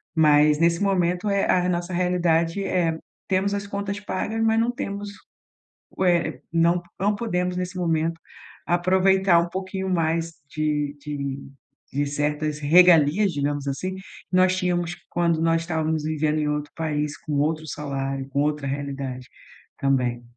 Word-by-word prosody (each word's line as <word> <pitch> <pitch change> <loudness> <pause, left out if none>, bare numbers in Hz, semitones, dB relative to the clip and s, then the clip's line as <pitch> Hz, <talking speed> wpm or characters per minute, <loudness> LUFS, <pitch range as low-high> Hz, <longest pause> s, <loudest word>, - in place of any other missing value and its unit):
Mas 150 -1 +5
nesse 170 +1 +2
momento 180 0 +1
é, 200 0 +2
a 185 - +3
re 180 0 0
nossa 175 +1 -2
realidade 175 0 +1
é: 170 -4 0 0.3
temos 195 +1 +1
as 200 0 -3
contas 200 0 -4
pagas 210 +2 -3
mas 225 0 +3
não 230 +1 +2
temos 205 -3 -5 0.9
ué, 175 -2 +1
não 170 +1 +3
po 175 - -25
não 205 +2 +1
podemos 180 -5 -1
nesse 180 +1 -4
momento 165 -1 0 0.5
aproveitar 185 +1 +3
um 170 0 -1
pouquinho 190 +1 -4
mais 165 -1 0 0.2
de 150 -1 -1
de 140 -2 -5 0.5
de 145 +2 0
certas 150 +1 -1
regalias, 170 +4 +5
digamos 145 -1 -2
assim, 185 +7 -3
que 190 - -9 0.3
nós 185 0 +4
tínhamos 175 -2 -1
quando 170 -2 +1
nós 165 0 +2
estávamos 160 -2 -1
vivendo 155 0 0
em 150 - 0
outro 150 0 -3
país 150 -2 -2
com 155 - -6
outro 155 +2 0
salário, 135 -2 -4
com 140 +1 0
outra 150 -1 -1
realidade, 135 -2 -4 0.5
também. 125 -3 0
165 Hz, 150 wpm, -24 LUFS, 150-185 Hz, 0.9 s, Mas